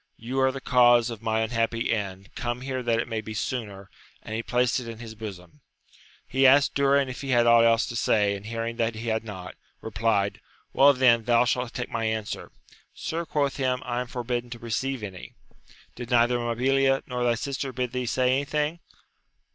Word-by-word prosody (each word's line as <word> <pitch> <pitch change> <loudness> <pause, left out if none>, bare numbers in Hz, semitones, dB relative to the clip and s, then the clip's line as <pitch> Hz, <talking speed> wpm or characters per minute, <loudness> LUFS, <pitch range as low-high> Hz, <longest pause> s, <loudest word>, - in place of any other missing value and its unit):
You 125 +4 -3
are 130 0 +3
the 135 - -6
cause 120 -2 +4
of 115 -2 -8
my 110 0 0
unhappy 115 +1 0
end; 95 -3 -5
come 120 +1 -3
here 130 -1 -3
that 120 -2 +1
it 115 - -1
may 115 -2 -3
be 110 0 -8
sooner! 105 -5 -4 0.4
and 110 - -7
he 110 - -1
placed 125 +2 +1
it 125 - -8
in 115 -1 -7
his 115 -1 -9
bosom. 105 +4 -10 0.7
He 135 +1 +4
asked 140 +1 +5
Durin 140 0 +3
if 130 0 -7
he 135 - -6
had 120 -2 +4
aught 115 0 +6
else 115 0 +4
to 120 - -6
say; 105 -3 +2
and 100 +1 -9
hearing 115 0 -4
that 115 -1 0
he 115 +1 -4
had 110 0 0
not, 95 -5 -8 0.3
replied, 100 -2 -1 0.3
Well 140 +1 +6
then, 120 -4 +4
thou 120 0 +4
shalt 125 0 -1
take 125 - -4
my 115 -1 -2
answer. 110 -1 -3 0.4
Sir, 165 +1 -4
quoth 140 -2 0
he, 135 - -1
I 125 -1 -1
am 125 - -5
forbidden 120 0 -3
to 120 - -7
receive 120 +2 -3
any. 95 -3 -8 0.3
— - - -26
Did 120 -1 -7
neither 120 0 +3
Mabilia 135 +3 +1
nor 125 -1 -3
thy 120 -1 +2
sister 135 +2 -4
bid 125 -1 -3
thee 125 -1 -3
say 125 +1 +2
anything 150 +4 -1
120 Hz, 205 wpm, -26 LUFS, 115-130 Hz, 0.7 s, aught